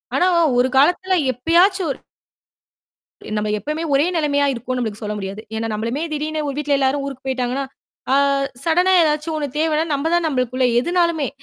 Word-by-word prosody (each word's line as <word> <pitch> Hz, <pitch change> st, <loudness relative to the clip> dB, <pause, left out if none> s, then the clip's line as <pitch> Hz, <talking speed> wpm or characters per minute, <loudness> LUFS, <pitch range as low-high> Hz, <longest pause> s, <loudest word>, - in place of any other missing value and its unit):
ஆனா, 360 Hz, -, +3 dB, 0.3 s
ஒரு 250 Hz, -, +3 dB
காலத்துல 360 Hz, +6 st, +3 dB, 0.2 s
எப்பயாச்சும் 345 Hz, -, +2 dB
ஒரு -, -, -16 dB, 1.4 s
நம்ப 210 Hz, 0 st, -1 dB
எப்பவுமே 305 Hz, +8 st, -4 dB
ஒரே 275 Hz, +2 st, +4 dB
நெலைமையா 285 Hz, -3 st, +1 dB
இருக்கோம்ன்னு 255 Hz, +1 st, -4 dB
நம்பளுக்கு 220 Hz, -2 st, -4 dB
சொல்ல 210 Hz, 0 st, -3 dB
முடியாது. 195 Hz, +1 st, -6 dB, 0.2 s
ஏன்னா, 225 Hz, +1 st, -2 dB
நம்பளுமே 230 Hz, +7 st, -3 dB
திடீர்ன்னு 305 Hz, +1 st, -2 dB
ஒரு 280 Hz, -, -3 dB
வீட்டுல 295 Hz, -1 st, +1 dB
எல்லாரும் 275 Hz, +1 st, +1 dB
ஊருக்குப் 270 Hz, -1 st, -8 dB
போய்ட்டாங்கன்னா, 260 Hz, +1 st, -1 dB, 0.5 s
அ -, -, +5 dB, 0.5 s
சடனா 355 Hz, +3 st, +3 dB
ஏதாச்சும் 305 Hz, +1 st, 0 dB
ஒண்ணு 295 Hz, -2 st, -2 dB
தேவைன்னா, 315 Hz, 0 st, +1 dB
நம்ப 285 Hz, +3 st, -1 dB
தான் 345 Hz, -1 st, +2 dB
நம்பளுக்குள்ள 255 Hz, -2 st, 0 dB
எதுனாலுமே, 340 Hz, -1 st, 0 dB
285 Hz, 160 wpm, -20 LUFS, 255-320 Hz, 1.4 s, அ